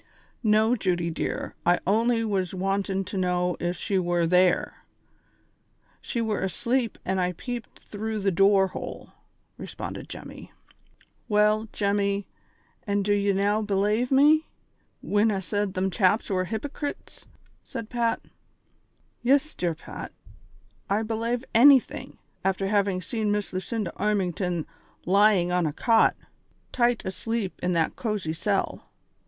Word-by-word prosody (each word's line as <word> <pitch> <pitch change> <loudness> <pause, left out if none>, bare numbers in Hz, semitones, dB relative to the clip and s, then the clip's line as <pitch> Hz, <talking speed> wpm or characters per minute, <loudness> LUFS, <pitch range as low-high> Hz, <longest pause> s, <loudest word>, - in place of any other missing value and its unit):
"Xo, 220 +2 +4
Judy 175 -3 0
dear, 160 - -3
I 175 +1 +3
only 230 +4 +2
was 190 -3 -1
wantin' 195 +1 -1
to 195 - -5
know 180 -1 0
if 175 0 -2
she 195 +2 0
were 175 -1 +1
there. 180 +1 +2 1.2
Slie 235 -2 -2
were 215 -2 -1
asleep 235 +6 -1
when 190 0 -1
I 180 0 0
peeped 240 +5 -7
through 220 +1 -5
the 195 0 +2
door 195 +1 +4
hole," - - -7 0.5
responded - - -7
Jemmy. - - -10 0.8
"Well, 210 +1 +3
Jemmy, 200 -1 0 0.6
an' 200 0 +1
do 205 +1 +2
ye 200 0 +2
now 200 +2 +1
belave 210 +4 +1
me, 300 +4 +5 0.6
whin 210 +2 +2
I 195 - -1
sed 205 +1 -2
them 190 +1 0
chaps 200 +3 +2
were 185 -1 +1
hypocrets? 285 - -6 0.2
" - - -35
said 230 -5 -6
Pat. 235 -2 0 1.0
"Yis, 280 +5 +2
dear 170 -2 -1
Pat, - - -8 0.8
I 210 +3 +1
belave 230 +3 -2
anything, 265 +3 +5 0.3
after 195 0 0
having 200 -3 +1
seen 215 +3 -1
Miss 205 -1 -2
Lucinda 185 0 -3
Armington 180 -5 -1 0.4
lying 195 -1 +4
on 180 -2 +2
a - - -1
cot, 225 +8 +3 0.6
tight 240 -1 +1
asleep 205 +1 -3
in 180 0 0
that 165 -2 +1
cozy 210 -9 -2
cell. 195 +4 -2
200 Hz, 135 wpm, -26 LUFS, 185-225 Hz, 1.2 s, me